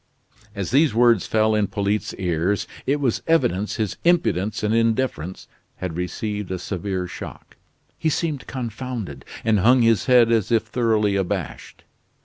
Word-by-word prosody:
As 100 -2 -3
these 140 -2 +3
words 120 -4 +4
fell 110 0 +2
on 105 -2 +1
Polyte's 100 +1 -2
ears, 90 +2 0 0.2
it 145 +2 +2
was 130 -5 0
evident 105 - +1
his 105 -4 -2
impudence 135 - +1
and 105 +1 +1
indifference 115 - 0 0.3
had 90 -3 -5
received 105 +3 -3
a 95 - -2
severe 95 0 -3
shock. 90 - -9 0.4
He 160 - +1
seemed 155 -3 -2
confounded, 115 - -5 0.2
and 110 -2 +3
hung 120 +5 +5
his 115 -3 +3
head 120 -2 +5
as 110 -2 +1
if 115 -2 +3
thoroughly 110 -3 +1
abashed. 95 -3 -4
110 Hz, 145 wpm, -22 LUFS, 95-120 Hz, 0.4 s, hung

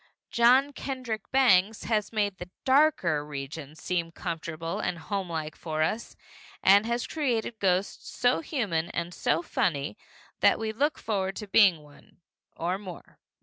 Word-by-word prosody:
John 255 +4 +4
Kendrick 255 -7 -5
Bangs 220 -5 +4
has 215 -3 0
made 205 -3 -1
the 180 - -7 0.2
darker 260 - +3
regions 150 +1 -7
seem 170 -2 -1
comfortable 165 -1 -4
and 175 - -2
homelike 165 -4 -4
for 155 -2 -2
us, 220 +8 -2 0.5
and 200 +3 +6
has 235 +1 -1
created 240 -7 -2
ghosts 190 0 0
so 245 +1 +2
human 205 - -2
and 170 +1 -4
so 165 0 0
funny 145 -1 -1 0.4
that - - +5
we 220 -1 -2
look 290 +8 0
forward 195 -3 -2
to 210 - -6
being 190 -6 +5
one 145 -1 -19 0.4
or 180 +3 -1
more. 185 -4 -11
195 Hz, 145 wpm, -28 LUFS, 165-230 Hz, 0.5 s, and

